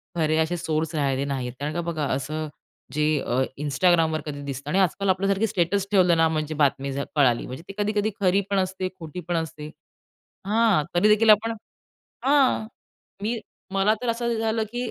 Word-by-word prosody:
खरे 155 -1 +1
असे 160 +2 +1
सोर्स 160 0 -2
राहिले 140 -2 0
नाहीत. 130 -3 -3
कारण 150 +2 -3
का 170 - -1
बघा 160 -3 -2
असं, 155 +4 -3 0.5
जे 150 0 +1
अ, 125 +1 0 0.2
Instagramवर 160 +2 +2
कधी 145 -2 -5
दिसतं 140 +1 -5
आणि 185 - +2
आजकाल 195 +1 +1
आपल्यासारखी 195 +3 +2
स्टेटस 190 +1 0
ठेवलं 180 -4 +4
ना, 165 0 +4
म्हणजे 155 -1 -2
बातमी 140 -2 +1
जर 140 +1 -3
कळाली. 130 -5 +3
म्हणजे 130 +6 -8
ती 195 - -8
कधी-कधी 210 +1 0
खरी 195 +1 +3
पण 200 -1 +2
असते, 185 0 -2
खोटी 160 +2 -7
पण 175 - -1
असते. 155 -2 -5 0.8
हां. 215 -6 +3
तरीदेखील 210 +4 +4
आपण 215 +2 +5 0.7
हां. 270 -5 +3 0.6
मी, 230 +2 -1 0.4
मला 200 +3 +3
तर 245 - -2
असं 235 0 -1
झालं, 225 0 0
की 245 0 -3
170 Hz, 175 wpm, -24 LUFS, 150-205 Hz, 0.8 s, आपण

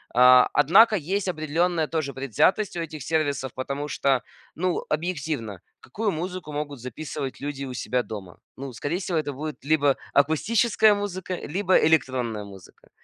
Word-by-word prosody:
А, 125 0 +7
однако 190 +10 +6
есть 195 +3 -2
определенная 160 0 0
тоже 155 -4 -2
предвзятость 140 - +1
у - - -2
этих 155 -2 -6
сервисов, 145 -3 -1
потому 140 +3 -4
что, 135 -3 +1 0.3
ну, 180 +1 -1
объективно 150 - -3 0.2
какую 210 - -3
музыку 180 -2 -5
могут 145 -2 -4
записывать 130 +2 -6
люди 140 -1 -4
у 130 - -6
себя 125 0 -1
дома? 95 -5 -8 0.2
Ну, 135 0 -7
скорее 150 +9 -3
всего 180 -3 -2
это 145 -2 -2
будет 150 0 -7
либо 145 -2 +3 0.2
акустическая 210 +9 +3
музыка, 190 -2 -4
либо 185 +3 0
электронная 130 -8 +1
музыка. 95 -3 -15
150 Hz, 145 wpm, -25 LUFS, 135-175 Hz, 0.3 s, А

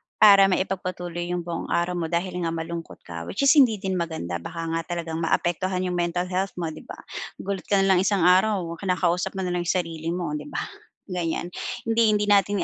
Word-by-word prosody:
para 200 -2 +8
maipagpatuloy 180 -2 -2
yung 175 -1 -2
buong 170 -1 -4
araw 175 +1 +1
mo 170 -2 -1
dahil 175 +2 -2
nga 165 - 0
malungkot 165 0 -6
ka 85 -1 -7
which 210 - -2
is 275 - +7
hindi 255 -7 +6
din 190 -1 -2
maganda 160 - -3
baka 165 - -6
nga 165 0 -1
talagang 165 -1 -4
maapektuhan 180 +3 0
yung 180 -1 -1
mental 175 +1 0
health 190 +2 -1
mo, 170 - -1
'di 155 - -10
ba, - - -7 0.4
gulat 195 -1 -3
ka 200 - +3
na - - +2
lang - - +4
isang 195 -2 +2
araw 185 +2 +4 0.2
kinakausap 180 0 0
mo 190 - -2
nalang 180 -1 -1
yung - - +2
sarili 165 -2 -5
mo, 175 -3 -2
'di - - -9
ba, - - -2 0.5
ganiyan, 175 -2 -2 0.4
hindi 225 -1 +4
hindi 210 0 +1
natin 200 -1 +3
180 Hz, 205 wpm, -25 LUFS, 170-195 Hz, 0.5 s, para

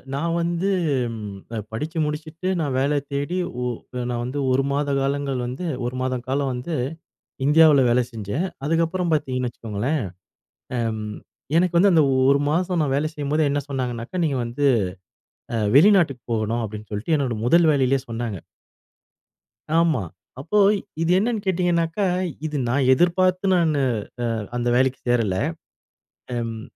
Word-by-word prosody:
நான் 165 +4 -1
வந்து 170 +3 0 0.4
ம் 105 -3 -6 0.2
அ - - -2
படிச்சு 155 +9 -4
முடிச்சுட்டு 155 +4 -5
நான் 145 -5 -1
வேல 140 +2 +1 0.2
தேடி. 145 +6 -2 0.2
ஓ - - -1 0.5
நான் 120 -1 -2
வந்து 130 +4 -3
1 130 +1 +3
மாத 145 +1 0
காலங்கள் 140 -1 -1
வந்து 130 +9 -5 0.2
1 125 +1 -3
மாத 130 -1 -1
காலம் 135 0 0
வந்து 125 +7 -4 0.7
இந்தியாவுல 150 -2 +6
வேல 120 +1 +4
செஞ்சேன். 115 - -3 0.2
அதுக்கப்புறம் 165 +2 0
பார்த்தீங்கன்னு 130 -4 0
வச்சுக்கோங்களேன், 120 +6 -2 0.8
அம். 110 -2 -2 0.4
எனக்கு 175 0 +2
வந்து 200 +3 +5
அந்த 160 - +5 0.3
1 140 +1 +5
மாசம் 175 +1 +1
நான் 140 -3 +1
வேலை 150 +2 0
செய்யும்போது 150 +1 -1
என்ன 145 +1 0
சொன்னாங்கனாக்கா, 125 +1 -4
நீங்க 140 -4 0
வந்து 120 +5 -3 1.1
வெளிநாட்டுக்கு 160 - +5
அ - - -21
போகணும் 115 +1 0
அப்டின்னு 105 0 -7
சொல்ட்டு 105 +10 -2
என்னோட 135 -5 0
முதல் 165 +6 +5
வேலையிலலேயே 135 -2 +2
சொன்னாங்க. 115 -3 -3 1.4
ஆமா. 160 -10 +2 0.4
அப்போ 165 +10 -1 0.4
இது 165 +1 +2
என்னன்னு 225 +1 0
கேட்டிங்கனாக்கா, 175 0 +1 0.4
இது 150 -1 -2
நான் 130 +1 +2
எதிர்பார்த்து 185 +4 +2
நான் 170 -2 +3
அ 130 - +3 0.7
அந்த 120 0 0
வேலைக்கு 130 +1 +2
சேரல. 115 -6 +2 1.0
அம் 115 -2 -3
140 Hz, 140 wpm, -23 LUFS, 120-165 Hz, 1.4 s, இந்தியாவுல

